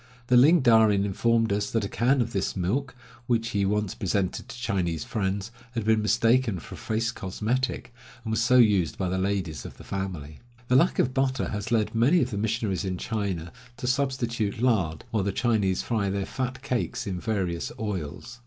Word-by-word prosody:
The 125 - +5
Ling 150 +7 +7
Darin 110 -5 +5
informed 115 +2 +1
us 105 0 -1
that 115 -3 0
a - - -1
can 125 +6 +2
of 115 0 -2
this 95 -2 -1
milk, 125 +10 -1 0.3
which 115 -1 +1
he 100 -3 0
once 105 -1 0
presented 95 -1 -2
to - - -8
Chinese 85 -9 -1
friends, 100 0 -2 0.2
had 115 -3 -2
been 110 0 +3
mistaken 115 0 +2
for - - -10
a - - -8
face 115 +1 -1
cosmetic, 115 +6 -2 0.3
and 110 - -3
was 110 - +1
so 125 +3 +4
used 100 -9 +4
by 95 -2 -1
the 95 +1 -1
ladies 95 -5 -2
of - - -10
the - - -12
family. 90 -7 -5 0.3
The 125 - +4
lack 170 +8 +4
of 130 - +2
butter 130 -1 0
has 105 +1 -4
led 110 -1 +1
many 125 +10 +4
of 125 - -4
the 100 - -2
missionaries 105 -4 -1
in 95 -1 -2
China 95 -6 -3 0.3
to - - -6
substitute 125 -5 -1
lard, 100 -11 +1
while 110 -3 +1
the 100 - 0
Chinese 100 -4 +1
fry 110 -4 0
their 100 0 -1
fat 130 0 -4
cakes 125 -3 -2
in 95 -3 -3
various 90 -5 -2
oils. 105 +3 -5
110 Hz, 195 wpm, -26 LUFS, 95-120 Hz, 0.3 s, Ling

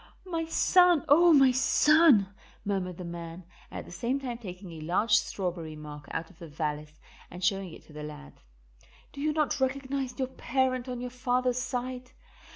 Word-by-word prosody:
"My 330 -3 -2
son! 350 -1 +4
oh, 340 +4 +6
my 270 -4 +6
son!" 265 - +4 0.3
murmured 185 -3 -2
the 180 - -7
man, 170 +1 -7 0.3
at - - -7
the - - -13
same 240 +10 -2
time 245 -4 -5
taking 185 -4 -9
a 165 - -9
large 195 +8 +2
strawberry 175 -7 -2
mark 150 -1 -10
out 165 +3 -5
of 170 - -23
the 170 - -9
valise 150 0 -4 0.3
and 180 +1 -9
showing 195 -1 0
it - - -12
to 155 - -18
the 150 - -8
lad. 150 0 -9 0.8
"Do 280 - -7
you 305 +1 +1
not 300 -2 0
recognize 265 -1 -2
your 260 -1 -2
parent 260 -1 -1
on 250 -1 -4
your 250 0 -5
father's 250 0 0
side? 250 0 -4
240 Hz, 175 wpm, -29 LUFS, 170-265 Hz, 0.8 s, oh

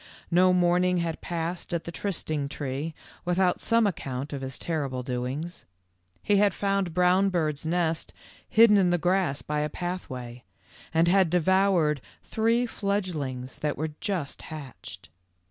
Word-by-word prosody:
No 180 +2 +5
morn 180 0 +3
ing 180 0 +2
had 170 -2 -2
passed 170 +1 -3
at 170 - -2
the 170 - -6
trysting 155 -7 -2
tree 145 +2 -4 0.3
without 180 0 +1
some 230 -1 +3
account 140 -7 -3
of 140 - -4
his 130 -1 -5
terrible 140 -6 -2
doings. 130 +7 -4 0.6
He 205 - +3
had 200 -1 +3
found 195 -4 0
Brownbird's 180 -4 +2
nest 165 -1 0 0.4
hidden 220 -2 +7
in 185 -2 +3
the 175 - +3
grass 180 -4 +1
by 150 0 -2
a 150 0 0
pathway, 130 -9 -5 0.5
and 165 +1 +3
had 190 -1 +4
devoured 180 -4 +3 0.2
three 230 +2 +1
fledgelings 165 - -3
that 150 -1 -1
were 155 +1 -2
just 185 -10 -3
hatched. 150 -5 -9
170 Hz, 145 wpm, -27 LUFS, 150-185 Hz, 0.6 s, hidden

